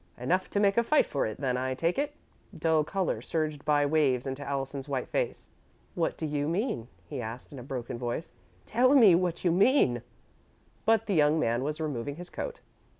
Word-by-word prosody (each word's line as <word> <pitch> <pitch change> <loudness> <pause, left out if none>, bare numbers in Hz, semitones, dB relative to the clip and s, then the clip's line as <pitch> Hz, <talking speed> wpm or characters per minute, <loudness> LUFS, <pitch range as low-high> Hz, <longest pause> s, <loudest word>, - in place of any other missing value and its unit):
"Enough 180 +10 0
to 205 - 0
make 200 0 +3
a 235 - +5
fight 300 +6 +3
for 140 - -1
it 110 - -5
then, 130 -3 0
I 130 0 -1
take 170 - 0
it." 290 +1 -2 0.4
Dull 160 -1 +2
colour 190 +4 -1
surged 155 -3 -2
by 145 -1 +3
waves 140 -4 +2
into 135 +1 -4
Allison's 140 0 -4
white 135 -2 -2
face. - - -2 0.5
"What 170 -3 -1
do 160 - -3
you 145 -1 -1
mean?" 175 - -1 0.2
he - - -5
asked, 115 +3 -7
in 135 - -8
a - - -7
broken 125 -2 -5
voice. 120 +7 -3 0.3
"Tell 255 +5 +4
me 220 -9 +8
what 175 0 0
you 175 - +4
mean!" 180 - +4 0.8
But 225 0 +3
the 205 - -1
young 155 -1 +4
man 120 -3 +1
was 150 +2 -3
removing 145 -3 -3
his 175 +2 -10
coat. - - -5
150 Hz, 200 wpm, -29 LUFS, 135-185 Hz, 0.8 s, me